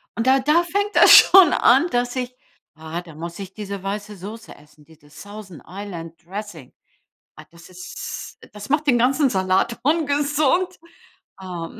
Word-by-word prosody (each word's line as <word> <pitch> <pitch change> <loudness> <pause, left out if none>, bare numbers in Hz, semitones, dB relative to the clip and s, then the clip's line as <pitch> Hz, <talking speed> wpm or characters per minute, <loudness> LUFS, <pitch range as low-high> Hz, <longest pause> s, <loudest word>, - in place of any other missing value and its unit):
Und 230 +2 -2
da 265 +1 +4
da 305 +6 +2
fängt 405 +4 -3
das - - +7
schon 375 -5 +8
an, 270 +8 +4
dass 245 +1 -1
ich 250 0 -5 0.4
Ah, 160 +2 -6
da 165 -4 -15
muss 170 +3 -8
ich 190 -1 -9
diese 200 -2 -7
weiße 205 +1 -6
Soße 220 +5 -10
essen, 150 0 -22
dieses 150 -2 -19
Thousand 205 -4 -12
Island 175 -4 -9
Dressing. 185 -7 -9 0.6
Ah, - - -13
das 170 +1 -17
ist 375 - -9
das 210 +2 -10
macht 300 +1 0
den 245 -3 +3
ganzen 270 +4 +2
Salat 190 +4 0
ungesund. 300 +4 0 0.6
Ähm. 175 -3 -8
210 Hz, 160 wpm, -21 LUFS, 175-280 Hz, 0.6 s, schon